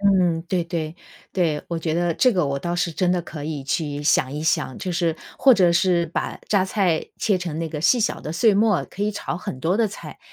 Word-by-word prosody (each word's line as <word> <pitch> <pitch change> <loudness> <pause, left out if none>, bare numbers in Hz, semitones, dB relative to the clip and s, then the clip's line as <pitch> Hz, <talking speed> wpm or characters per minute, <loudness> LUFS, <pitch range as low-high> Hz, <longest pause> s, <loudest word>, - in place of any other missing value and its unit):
嗯， 185 -5 +3
对 180 -2 0
对， 165 -1 -4 0.4
对。 165 -5 0
我 170 - -2
觉 160 -1 -2
得 170 0 +1
这 255 +7 +4
个 180 -7 +1
我 140 0 -1
倒 175 +4 -3
是 175 0 0
真 180 +2 +1
的 180 - +1
可 150 -3 -8
以 150 -3 -4
去 145 0 -2
想 140 -3 +2
一 150 +1 -4
想， 155 -5 0
就 185 - -4
是 170 -2 0 0.2
或 270 - +7
者 180 -5 +4
是 170 -1 +2
把 165 - -3
榨 200 -3 +3
菜 190 -5 +1
切 200 -3 +2
成 170 -4 -4
那 165 - -2
个 150 -1 -5
细 235 +10 +4
小 220 - 0
的 155 - -5
碎 215 +5 +4
末， 210 -2 +3
可 200 - -6
以 210 - +1
炒 185 - -4
很 130 -7 -6
多 175 +6 +1
的 230 -1 +3
菜。 205 - -9
170 Hz, 255 characters per minute, -23 LUFS, 155-190 Hz, 0.4 s, 或